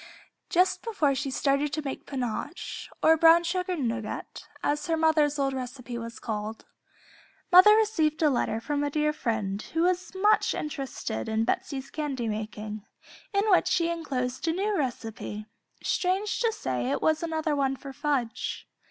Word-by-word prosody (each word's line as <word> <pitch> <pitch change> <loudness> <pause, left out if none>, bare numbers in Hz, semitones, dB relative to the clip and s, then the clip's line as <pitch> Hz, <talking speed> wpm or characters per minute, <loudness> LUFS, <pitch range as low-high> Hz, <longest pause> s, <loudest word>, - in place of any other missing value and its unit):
Just 365 +1 +3
before 365 -12 +1
she 275 +1 -2
started 275 +2 +1
to 310 0 -2
make 270 - -5
"Pinoche" 255 +4 -4
or 320 - +7
"Brown 330 +1 +7
Sugar 360 +1 -1
Nougat," 235 -7 -4 0.2
as 295 0 0
her 325 -1 +1
mother's 310 -2 +3
old 275 -1 +1
recipe 250 -1 -6
was 230 0 -6
called, 215 0 -5 0.9
mother 370 +4 +9
received 335 -9 +2
a 305 - +6
letter 225 -3 0
from 290 +4 -1
a 290 - 0
dear 300 +1 +1
friend, 215 -8 -2
who 325 +7 -1
was 360 0 0
much 420 +3 +3
interested 270 - -4
in 220 0 +1
Betsey's 270 +2 -2
candy 275 -6 -3
making, 215 -1 -5 0.5
in 400 0 +1
which 365 - +5
she 360 -2 +2
enclosed 260 -5 -3
a 325 - +2
new 405 +4 0
recipe; 225 - -4 0.4
strange 385 +3 0
to 460 -2 +2
say 125 - -2
it - - 0
was 315 -1 +3
another 320 -2 -1
one 270 -1 +1
for 275 0 -9
fudge. 280 -5 -2
290 Hz, 160 wpm, -27 LUFS, 240-335 Hz, 0.9 s, mother